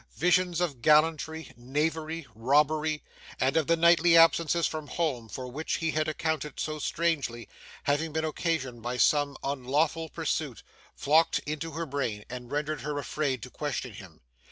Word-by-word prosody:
Visions 180 Hz, 0 st, +2 dB
of 150 Hz, -9 st, -2 dB
gallantry, 160 Hz, +2 st, +2 dB
knavery, 155 Hz, +5 st, -2 dB
robbery; 150 Hz, +6 st, +1 dB, 0.4 s
and 135 Hz, +3 st, +1 dB
of 160 Hz, -3 st, +2 dB
the 165 Hz, -, +3 dB
nightly 170 Hz, 0 st, +5 dB
absences 165 Hz, 0 st, +4 dB
from 155 Hz, -2 st, -3 dB
home 135 Hz, -10 st, -2 dB
for 130 Hz, +4 st, -6 dB
which 145 Hz, +6 st, -3 dB
he 160 Hz, -1 st, -1 dB
had 155 Hz, 0 st, 0 dB
accounted 155 Hz, -2 st, -2 dB
so 155 Hz, 0 st, -3 dB
strangely, 145 Hz, -9 st, -1 dB, 0.4 s
having 150 Hz, +3 st, 0 dB
been 160 Hz, +1 st, -1 dB
occasioned 150 Hz, -6 st, -2 dB
by 120 Hz, +2 st, -3 dB
some 145 Hz, 0 st, +3 dB
unlawful 145 Hz, +4 st, 0 dB
pursuit; 155 Hz, -5 st, -3 dB, 0.3 s
flocked 160 Hz, +3 st, +3 dB
into 155 Hz, +2 st, -4 dB
her 165 Hz, +1 st, -3 dB
brain 125 Hz, -8 st, -3 dB
and 125 Hz, -1 st, -7 dB
rendered 150 Hz, -1 st, -2 dB
her 150 Hz, +2 st, -3 dB
afraid 140 Hz, -4 st, -2 dB
to 125 Hz, -, -9 dB
question 135 Hz, -5 st, -4 dB
him. 95 Hz, -7 st, -13 dB
150 Hz, 155 wpm, -28 LUFS, 135-160 Hz, 0.4 s, nightly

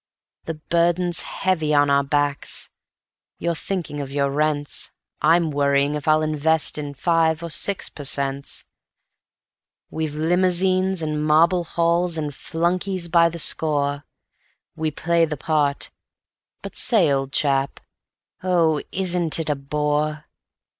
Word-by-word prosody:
The 165 Hz, -, -4 dB
burden's 170 Hz, +2 st, +1 dB
heavy 160 Hz, -5 st, -1 dB
on 145 Hz, -1 st, +4 dB
our 140 Hz, 0 st, +4 dB
backs 145 Hz, 0 st, -2 dB, 0.7 s
you're 170 Hz, -, -1 dB
thinking 170 Hz, -3 st, -4 dB
of 140 Hz, -2 st, -5 dB
your 140 Hz, 0 st, 0 dB
rents, 145 Hz, 0 st, -1 dB, 0.3 s
I'm 165 Hz, -1 st, +3 dB
worrying 140 Hz, 0 st, +2 dB
if 150 Hz, 0 st, -5 dB
I'll 155 Hz, 0 st, +4 dB
invest 155 Hz, 0 st, 0 dB
in 145 Hz, -1 st, -6 dB
five 165 Hz, +1 st, +1 dB
or 170 Hz, -, -5 dB
six 200 Hz, +5 st, +1 dB
per 145 Hz, -, -9 dB
cents. 140 Hz, 0 st, 0 dB, 1.3 s
We've 155 Hz, -2 st, -3 dB
limousines, 185 Hz, +2 st, +1 dB
and 150 Hz, -1 st, -2 dB
marble 170 Hz, +3 st, +3 dB
halls, 170 Hz, +1 st, +1 dB
and 150 Hz, -2 st, -2 dB
flunkeys 175 Hz, +4 st, -2 dB
by 170 Hz, 0 st, +5 dB
the 170 Hz, -, -7 dB
score, 145 Hz, -3 st, +1 dB, 0.7 s
We 160 Hz, -1 st, -1 dB
play 170 Hz, +2 st, +1 dB
the 150 Hz, -2 st, -5 dB
part... 145 Hz, -1 st, -1 dB, 0.7 s
but -, -, -8 dB
say, 190 Hz, -, +3 dB
old 135 Hz, -1 st, -1 dB
chap, 135 Hz, -1 st, 0 dB, 0.6 s
oh, 170 Hz, -5 st, +2 dB
isn't 180 Hz, -3 st, -1 dB
it 160 Hz, -2 st, -1 dB
a -, -, 0 dB
bore? 150 Hz, +2 st, -2 dB
155 Hz, 130 wpm, -22 LUFS, 145-170 Hz, 1.3 s, by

